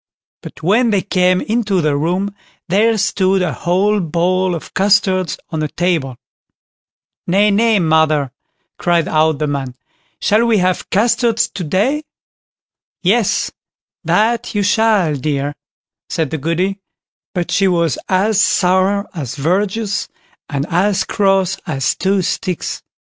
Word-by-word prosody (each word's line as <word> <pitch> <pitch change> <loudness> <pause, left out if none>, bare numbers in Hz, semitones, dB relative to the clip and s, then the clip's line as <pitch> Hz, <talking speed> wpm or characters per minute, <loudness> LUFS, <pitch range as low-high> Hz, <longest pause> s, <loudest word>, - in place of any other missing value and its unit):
But - - -11
when 225 +8 +3
they 200 -3 +1
came 185 -2 +2
into 215 -4 0
the 155 -3 +1
room, 180 +7 -1 0.3
there 215 +5 +2
stood 195 -2 +1
a 165 -5 -1
whole 195 - +1
bowl 180 +2 0
of 165 - -9
custards 190 -2 +2
on 160 - -2
the 155 - -1
table. 160 -7 -1 1.1
"Nay, 200 +4 +3
nay, 220 +2 +3
mother", 155 -5 +2 0.5
cried 170 -2 +1
out 155 0 +2
the 150 - -1
man; 135 -3 -3 0.4
"shall 220 +3 +2
we 225 -2 +3
have 185 -1 0
custards 230 +2 +2
to 185 - -6
day?" 210 - 0 1.0
"Yes, 205 +3 +1 0.5
that 230 +1 +1
you 205 - +1
shall, 205 -5 +2
dear", 145 +1 -2 0.6
said 160 -4 -2
the 160 - -3
Goody; 180 +6 -1 0.6
but 175 -1 -2
she 195 - +2
was 170 -7 +1
as 195 +2 +2
sour 190 +2 +2
as 145 -9 -5
verjuice, 200 +7 -1 0.4
and 140 -2 -2
as 190 +3 +2
cross 195 -2 +1
as 135 -4 0
two 195 0 0
sticks. 185 -1 -3
185 Hz, 130 wpm, -17 LUFS, 160-205 Hz, 1.1 s, when